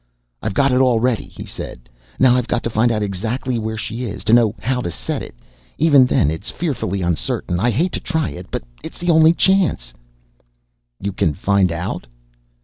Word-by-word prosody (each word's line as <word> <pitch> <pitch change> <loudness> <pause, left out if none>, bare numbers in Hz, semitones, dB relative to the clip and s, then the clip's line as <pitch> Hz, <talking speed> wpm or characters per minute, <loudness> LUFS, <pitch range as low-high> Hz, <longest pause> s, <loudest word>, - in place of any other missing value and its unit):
"I've - - -3
got 140 -1 +3
it 125 - +3
all 125 -3 +3
ready," 120 -1 0
he - - -10
said. - - -8 0.3
"Now, 125 -1 +5
I've 125 -2 0
got 120 - -1
to 115 - -2
find 115 +2 +2
out 105 -2 0
exactly 115 +6 -2
where 110 0 -3
she 115 +3 -4
is, 105 - -6
to 110 - +2
know 115 -3 +4
how 125 +1 -1
to 85 - -3
set - - -4
it. - - -9 0.4
Even 145 -4 +5
then 75 - +2
it's 80 +7 -4
fearfully 110 - -2
uncertain. 85 +1 -1
I 120 - +2
hate 160 - +1
to - - -2
try 160 -2 -1
it, 90 +1 -9
but - - -4 0.2
it's - - -9
the 175 0 +1
only 160 0 +6
chance. 175 - +2 1.1
"You 100 - -3
can 80 -5 0
find 95 -1 +2
out?" 85 -6 -4
115 Hz, 200 wpm, -19 LUFS, 95-130 Hz, 1.1 s, only